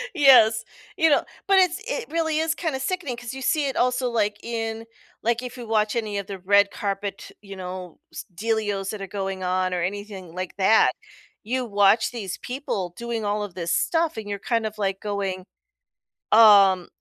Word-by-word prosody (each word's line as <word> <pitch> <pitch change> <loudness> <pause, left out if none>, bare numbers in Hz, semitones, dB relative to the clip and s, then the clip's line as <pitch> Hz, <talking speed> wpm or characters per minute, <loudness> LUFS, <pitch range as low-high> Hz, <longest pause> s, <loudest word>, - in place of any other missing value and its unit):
Yes. 240 -7 +6 0.3
You 325 - +4
know? 290 - +3 0.2
But 390 -1 +5
it's 365 +1 +2
it - - -3
really 320 -1 0
is 320 0 0
kinda 310 -6 -2
sickening 305 -5 -3
'cause 245 0 -7
you 265 - -7
see 295 +2 +1
it 270 - -3
also, 250 0 +1
like, 210 -3 0
in, 225 -1 -4 0.4
like, 235 +1 +1
if 250 0 -7
you 240 -2 -8
watch 215 -1 +1
any 215 -3 -2
of 200 -1 -4
the 195 -2 -7
red 200 +2 +4
carpet, 200 0 -4
you 200 -1 -10
know, 180 -2 -7
s - - -7
dealios 205 -1 -1
that 215 - -7
are 195 - -5
going 195 -1 -4
on 185 0 0
or 175 - -1
anything 195 -2 -5
like 185 0 -5
that, 200 +3 +5 0.5
you 250 +3 -2
watch 205 0 +3
these 205 -7 -5
people 225 -9 -4
doing 235 -2 -4
all 205 +1 -1
of 205 -3 -7
this 170 -2 -1
stuff, 325 -5 0
and 215 -2 -6
you're 200 -1 -3
kind 230 +1 -1
of, 215 0 -5
like, 195 -2 -1
going, 195 -3 -3 0.9
"Um, 200 -5 +7
215 Hz, 190 wpm, -24 LUFS, 195-245 Hz, 0.9 s, Um